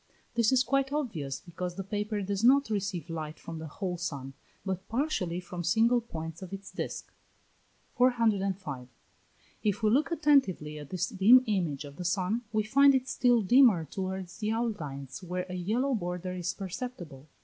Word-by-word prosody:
This 235 -1 +3
is 260 -1 +4
quite 275 0 +1
obvious, 195 - -2
because 180 0 -5
the 195 - -4
paper 210 +1 -2
does 200 +2 -2
not 270 0 +5
receive 195 -4 -2
light 160 -2 -5
from 165 -1 -8
the 160 - -6
whole 180 +3 -4
sun, 140 -6 -4 0.3
but 190 -1 -4
partially 220 - -1
from 175 -1 -6
single 230 +7 +3
points 165 -6 -7
of 185 - -8
its 195 0 -7
disk. - - -5 0.8
405. 195 - +1 0.7
If 210 +1 -1
we 215 - +4
look 285 +7 +3
attentively 270 - +2
at 145 - -10
this 180 -1 -1
dim 225 +7 +6
image 170 -9 -1
of 140 0 -11
the 180 - -5
sun, 190 +5 0
we 215 -1 +1
find 275 +5 +5
it 260 0 0
still 245 -4 +3
dimmer 220 -6 +5
towards 190 +2 -5
the 215 - -1
outlines 165 - -3
where 180 0 -3
a 185 - -7
yellow 220 +10 0
border 180 -3 -3
is 180 -1 -2
perceptible. 185 - -7
190 Hz, 170 wpm, -29 LUFS, 175-235 Hz, 0.8 s, dim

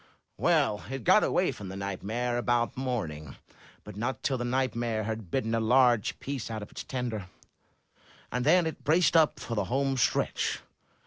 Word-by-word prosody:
"Well, 105 - +2
it 135 -2 -5
got - - +5
away - - +2
from 100 -2 -8
the 95 - -7
nightmare 110 +5 -2
about 120 -1 +1
morning, 85 - -4 0.5
but - - -10
not 120 +5 -3
till 130 -3 0
the - - -2
nightmare 120 -3 -1
had 110 -3 -4
bitten 115 +1 -1
a 115 - +2
large 120 -1 +3
piece 135 -4 -4
out 110 -2 -4
of - - -11
its - - -7
tender, 120 -7 -4 1.0
and 125 +1 -1
then 170 +5 +5
it 160 - -5
braced 165 +3 +3
up 160 -2 +4
for 115 - -5
the 105 -3 0
home 135 +4 0
stretch. 120 - 0
120 Hz, 175 wpm, -29 LUFS, 110-130 Hz, 1.0 s, got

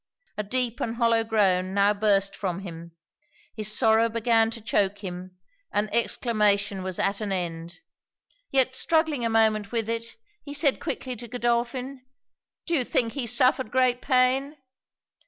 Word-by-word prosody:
A - - -2
deep 240 +2 -2
and 230 0 -2
hollow 230 -1 +2
groan 190 -4 +1
now 200 +1 +4
burst 200 -1 +1
from 190 -2 -3
him: 170 -3 -9 0.6
his 215 -1 -2
sorrow 225 0 +3
began 225 0 +2
to 230 - -7
choak 205 -2 -1
him; 180 0 -7 0.3
and 210 +1 -1
exclamation 210 -4 +1
was 185 -1 -4
at 200 +2 -1
an 210 -2 -3
end; 170 - -4 0.7
yet 260 -1 +2
struggling 315 -2 +1
a 230 - +1
moment 220 -2 +2
with 230 -2 -1
it, 230 0 -4 0.3
he 285 0 -7
said 285 -2 +2
quickly 255 -1 -4
to 240 +2 -9
Godolphin 245 +2 -2 0.6
'Do 340 - -3
you 280 -6 +2
think 230 -1 0
he 270 -4 -3
suffered 255 +1 +2
great 250 0 +1
pain?' 265 +2 +2
225 Hz, 155 wpm, -25 LUFS, 200-250 Hz, 0.7 s, now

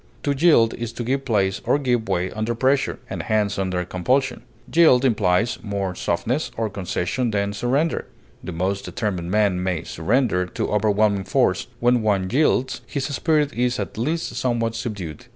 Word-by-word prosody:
To 145 - +1
yield 135 -7 +4
is 120 -1 -5
to 120 - -4
give 135 +3 -1
place 100 -5 +1
or - - +2
give 120 -6 0
way 90 -1 0
under 110 +2 -2
pressure, 135 +3 +1
and - - -4
hence 105 -2 0
under 90 -2 -1
compulsion. 125 +9 0 0.3
Yield 145 -6 +6
implies 105 -1 +2
more 100 -3 -2
softness 115 - -1
or 110 -2 -1
concession 100 +5 -2
than 100 -1 -1
surrender; 130 +11 0 0.4
the - - -5
most 95 +4 -2
determined 90 -5 -3
men 100 -2 +2
may 90 -3 -1
surrender 95 +1 0
to - - -3
overwhelming 105 -1 +2
force; - - +1
when 120 0 +3
one 100 -3 +1
yields, 130 -1 +1
his 140 -2 -3
spirit 150 -2 +1
is 125 +1 0
at - - -4
least 155 +9 -2
somewhat 115 -2 0
subdued. 100 -10 -5
110 Hz, 165 wpm, -22 LUFS, 95-125 Hz, 0.4 s, Yield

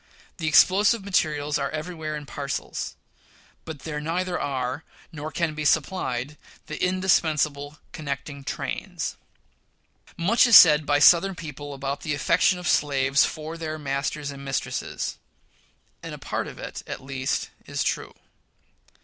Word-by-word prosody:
The 160 -4 -3
explosive 195 +7 +5
materials 150 -6 0
are 140 - -1
everywhere 155 -1 -4
in 150 -1 -6
parcels; 140 0 -4 0.7
but 155 -4 -7
there 150 0 -4
neither 175 +3 -1
are, 130 +1 -2 0.3
nor 155 0 -6
can 165 -1 -1
be 155 0 -4
supplied 145 -3 0 0.3
the 155 +1 -5
indispensable 155 -6 +1
connecting 140 -1 -5
trains. - - -4 1.0
Much 205 +9 +4
is 235 - +7
said 150 -3 +7
by 145 0 +4
Southern 175 +6 +6
people 145 -3 -7
about 135 +1 -4
the 150 -1 -2
affection 165 +6 +3
of 180 -1 -5
slaves 140 -1 +3
for 160 +1 -6
their 155 -1 -4
masters 140 0 -2
and 140 0 -9
mistresses; 135 0 -3 0.8
and - - -7
a - - -10
part - - -3
of - - -9
it, - - -7
at - - -6
least, 135 -1 -2 0.2
is - - -1
true. - - -2
150 Hz, 140 wpm, -25 LUFS, 140-165 Hz, 1.0 s, is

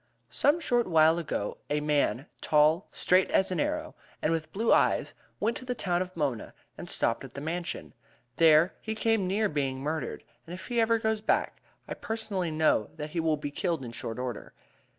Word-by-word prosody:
"Some 295 +4 +3
short 240 -7 +1
while 160 -1 +5
ago 125 -10 -3
a 150 - +1
man, 150 -3 +1 0.2
tall, 155 +4 +3
straight 185 +1 +3
as 190 0 +2
an 180 - -1
arrow, - - -2 0.3
and 155 - 0
with 160 -1 -3
blue 225 +3 +2
eyes, - - +2 0.3
went 225 +3 0
to 255 - -9
the 250 0 -2
town 180 -5 0
of 185 -1 -5
Mona 140 -8 -2 0.2
and - - -9
stopped 115 - 0
at 135 - -11
the - - -4
Mansion. 165 +4 -4 0.4
There 160 +1 +6
he 220 0 -4
came 220 -3 +1
near 210 +3 +1
being 135 -6 -2
murdered, 155 +3 -3 0.2
and 175 - -6
if 185 - -9
he 240 -2 +1
ever 230 0 +3
goes 220 -1 -1
back, 220 - 0 0.3
I - - -4
personally 205 -6 -3
know 155 -9 +2
that 150 -1 -6
he 170 - -2
will 160 -2 +1
be 145 -1 -5
killed 165 -4 -2
in 120 - -7
short 115 0 -6
order. 125 -3 -5
165 Hz, 195 wpm, -28 LUFS, 150-210 Hz, 0.4 s, There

